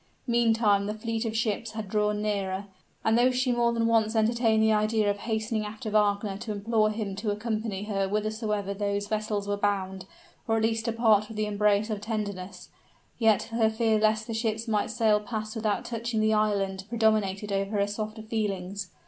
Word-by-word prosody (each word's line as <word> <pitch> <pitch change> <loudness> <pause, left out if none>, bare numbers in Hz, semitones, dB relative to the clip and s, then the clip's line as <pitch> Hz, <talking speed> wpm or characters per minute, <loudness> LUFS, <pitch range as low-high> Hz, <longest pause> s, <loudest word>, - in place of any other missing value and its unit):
Meantime 225 -4 +3
the 210 - -3
fleet 225 +1 -3
of 225 0 -2
ships 225 0 -1
had 220 -2 -5
drawn 210 +1 0
nearer, 200 -2 -2 0.4
and 220 - +4
though 240 +2 +5
she 255 0 +1
more 240 -1 +2
than 230 -1 0
once 225 -1 +2
entertained 220 0 +3
the 220 0 +4
idea 215 0 +2
of 200 - -5
hastening 220 0 -1
after 215 +2 -6
Wagner 205 -1 +1
to 215 - -5
implore 215 +1 +1
him 210 -2 -3
to 210 +2 -3
accompany 215 -1 -2
her 195 -2 -1
whithersoever 210 -1 -2
those 200 0 -1
vessels 210 -1 -2
were 205 - 0
bound, 190 -2 -1 0.4
or 225 0 +2
at 220 - 0
least 225 0 0
to 230 - +1
part 220 -2 +3
with 220 - -9
the 215 - +1
embrace 210 +1 +1
of 210 -1 -3
tenderness, 205 -4 -5 0.5
yet 220 -3 +4
her 225 -1 +3
fear 220 -1 +1
lest 215 0 +2
the 230 - -5
ships 225 0 -2
might 210 -2 0
sail 220 -2 +3
past 215 0 -5
without 215 -2 -1
touching 230 -1 -2
at - - +2
the 220 0 +3
island, 200 -3 0
predominated 215 -3 +1
over 195 +1 -1
her 200 - +3
softer 215 +1 -5
feelings. 200 -3 -3
215 Hz, 190 wpm, -27 LUFS, 205-225 Hz, 0.5 s, though